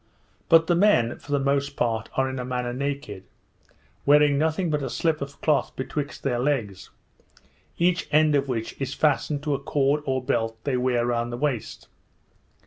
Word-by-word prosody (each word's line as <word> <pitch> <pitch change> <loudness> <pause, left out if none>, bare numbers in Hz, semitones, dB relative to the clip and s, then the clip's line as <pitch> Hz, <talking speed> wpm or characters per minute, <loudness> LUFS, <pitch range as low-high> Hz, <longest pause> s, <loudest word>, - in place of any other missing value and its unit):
But 165 0 +6
the 175 - +2
men, 170 - +3
for 145 - -12
the 145 - +3
most 140 0 0
part, 115 -5 -1
are 135 0 +2
in 130 0 -4
a - - -3
manner 125 -1 -3
naked, 135 -7 -4 0.8
wearing 145 0 +5
nothing 160 +3 0
but 150 -1 0
a 135 - -3
slip 160 +3 0
of 140 0 -7
cloth 150 -3 +1
betwixt 145 +2 -5
their 125 -3 0
legs, 115 -9 -2 0.9
each 180 +1 +1
end 155 0 +4
of 140 -1 +1
which 115 -3 -3
is 135 0 -3
fastened 145 -1 +1
to 150 -1 0
a 135 - -1
cord 140 +1 +1
or 130 -1 0
belt 115 -2 -1
they 140 -3 -1
wear 125 -1 +1
round 120 0 -1
the 120 - -4
waist. 130 -5 -3
140 Hz, 180 wpm, -25 LUFS, 125-150 Hz, 0.9 s, But